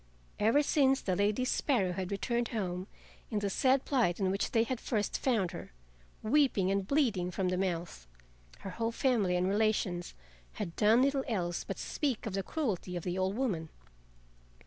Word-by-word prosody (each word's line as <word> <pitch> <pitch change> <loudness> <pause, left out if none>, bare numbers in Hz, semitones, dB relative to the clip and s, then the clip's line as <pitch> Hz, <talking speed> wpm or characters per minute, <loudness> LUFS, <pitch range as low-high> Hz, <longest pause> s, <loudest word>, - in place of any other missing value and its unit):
Ever 230 +8 +4
since 270 -2 +3
the 185 - -1
Lady 205 +6 +1
Sparrow 240 -8 +1
had 185 0 -4
returned 235 +4 -1
home 185 -4 -3 0.4
in 215 - -2
the 205 -1 -1
sad 265 +5 +2
plight 235 -11 +1
in 190 -2 +1
which 195 - -1
they 225 -1 +3
had 245 +1 -3
first 210 -4 -1
found 220 -9 +1
her, 170 - -9 0.5
weeping 220 -6 +3
and 195 -1 0
bleeding 225 -11 +1
from 185 0 -1
the 185 - 0
mouth, 175 - -3 0.5
her 195 - -6
whole 225 +4 -2
family 230 -7 +1
and 180 +1 +1
relations 200 -4 0 0.4
had 165 - -5
done 220 +4 +5
little 275 0 +1
else 175 -7 -2
but - - -5
speak 275 -7 -2
of 215 - -4
the 195 - 0
cruelty 195 - -3
of 175 - -4
the 180 -1 -2
old 190 +1 0
woman. 195 -11 -1
205 Hz, 175 wpm, -31 LUFS, 180-245 Hz, 0.5 s, done